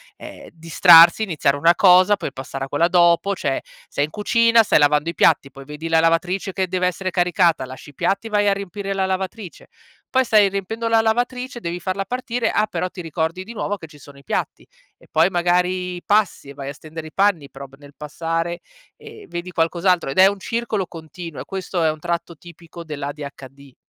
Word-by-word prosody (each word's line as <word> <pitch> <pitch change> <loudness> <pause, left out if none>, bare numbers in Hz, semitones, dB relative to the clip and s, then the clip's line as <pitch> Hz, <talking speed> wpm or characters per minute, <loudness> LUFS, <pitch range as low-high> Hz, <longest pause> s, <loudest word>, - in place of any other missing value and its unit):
ehm, - - -12
distrarsi, 165 +2 +6
iniziare 160 -8 0
una 165 +4 +3
cosa, 185 +2 +5
puoi 145 -8 -6
passare 135 +1 -6
a - - -11
quella 145 +5 +1
dopo, 175 +2 +3
cioè 135 -6 -2 0.3
sei 145 - -1
in - - -12
cucina, 230 +4 +3
stai 205 - +3
lavando 150 +1 +2
i - - -4
piatti, 140 -3 +2
poi 135 0 -12
vedi 150 +3 -7
la 165 0 +3
lavatrice 170 +4 0
che 190 0 -2
deve 180 0 0
essere 185 +1 -3
caricata, 175 -4 +2
lasci 130 +2 -11
i - - -30
piatti, 200 - -1
vai 205 -1 +1
a 200 - +4
riempire 195 0 -6
la 190 -1 0
lavatrice, 190 0 -5 0.4
poi 260 0 +2
stai 210 -4 +4
riempiendo 200 +4 -4
la 225 0 +3
lavatrice, 245 +3 -2
devi 175 -4 -5
farla 190 +2 -3
partire, 245 +1 -2
ah, - - +1
però 180 -2 -3
ti 180 - -9
ricordi 165 +2 -3
di 225 +5 -10
nuovo 205 -2 -3
che 170 - -10
ci 150 -2 -16
sono 140 0 -15
i 140 - -17
piatti - - -4 0.3
e - - -22
poi 160 +3 +3
magari 180 0 0
passi 205 -8 0
e - - -9
vai 140 0 -6
a - - -6
stendere 155 +2 -10
i 155 - -14
panni 195 -8 +1
però 140 +1 -10
p 135 - -18
nel 145 0 -16
passare 165 +3 -4 0.3
e 440 -2 -13
vedi 175 +1 -6
qualcos'altro. 170 0 +1
Ed 135 - -5
è 190 - +8
un 200 0 -2
circolo 220 -3 -3
continuo 165 -1 -9
e - - -9
questo 190 -2 -3
è 160 - +3
un 155 - -9
tratto 170 0 -4
tipico 170 0 -12
dell'ADHD. 140 -2 -8
175 Hz, 205 wpm, -21 LUFS, 155-195 Hz, 0.4 s, è